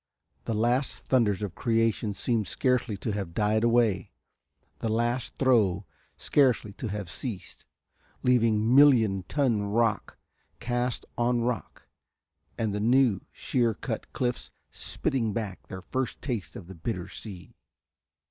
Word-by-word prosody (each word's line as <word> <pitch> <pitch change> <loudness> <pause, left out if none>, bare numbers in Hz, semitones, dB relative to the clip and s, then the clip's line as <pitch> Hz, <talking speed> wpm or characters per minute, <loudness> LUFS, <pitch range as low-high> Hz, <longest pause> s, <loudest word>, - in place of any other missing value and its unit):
The 115 - -1
last 120 0 +1
thunders 105 0 +1
of 100 -4 -4
creation 115 -1 0
seemed 110 -2 0
scarcely 125 -5 0
to 110 - -3
have 100 -5 -4
died 105 +3 +2
away, 115 -4 +2 0.7
the 115 - -2
last 120 +3 -1
throe 105 -8 +3 0.3
scarcely 125 -7 +2
to 115 - -5
have 105 -2 -4
ceased, 105 +3 -6 0.6
leaving 115 -2 +3
million 120 -9 +6
ton 130 -8 +1
rock 110 +2 0 0.4
cast 120 0 -2
on 120 0 +2
rock 120 -1 -3 0.7
and 110 -3 -1
the 105 - -2
new, 120 -1 +3
shear 120 -4 0
cut - - -5
cliffs 125 -1 -2 0.2
spitting 115 -6 -1
back 105 -4 -5
their 95 -2 -8
first 130 +2 -3
taste 120 -8 -4
of 95 - -8
the 95 - -10
bitter 90 +1 -4
sea. 95 -6 -10
115 Hz, 130 wpm, -28 LUFS, 100-125 Hz, 0.7 s, million